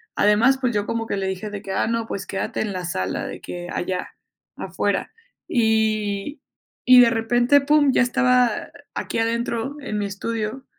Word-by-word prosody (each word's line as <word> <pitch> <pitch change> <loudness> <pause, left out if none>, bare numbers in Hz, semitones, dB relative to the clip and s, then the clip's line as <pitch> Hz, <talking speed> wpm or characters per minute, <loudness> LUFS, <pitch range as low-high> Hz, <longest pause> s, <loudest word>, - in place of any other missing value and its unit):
además, 210 +6 +4
pues, 250 -2 0
yo 205 0 0
como 225 0 -3
que - - -2
le 195 -1 -2
dije 190 +3 -4
de 205 -1 -6
que: 195 - -7
"Ah, 190 - 0
no, 230 0 -1
pues, 200 -3 -5
quédate 195 - -3
en 215 -2 -2
la 185 -1 -4
sala 95 - -3
de - - -7
que 175 0 -7
allá, 180 0 -3 0.5
afuera". - - -2 0.3
Y 220 +2 0 0.5
y 250 -1 +10
de 235 -1 +5
repente, 240 +4 +3
pum, 290 0 +4
ya - - +4
estaba 250 -1 +2 0.2
aquí - - -3
adentro 235 +3 -1
en 215 -7 -4
mi 205 - -1
estudio. 225 +5 -4
225 Hz, 180 wpm, -22 LUFS, 200-245 Hz, 0.5 s, y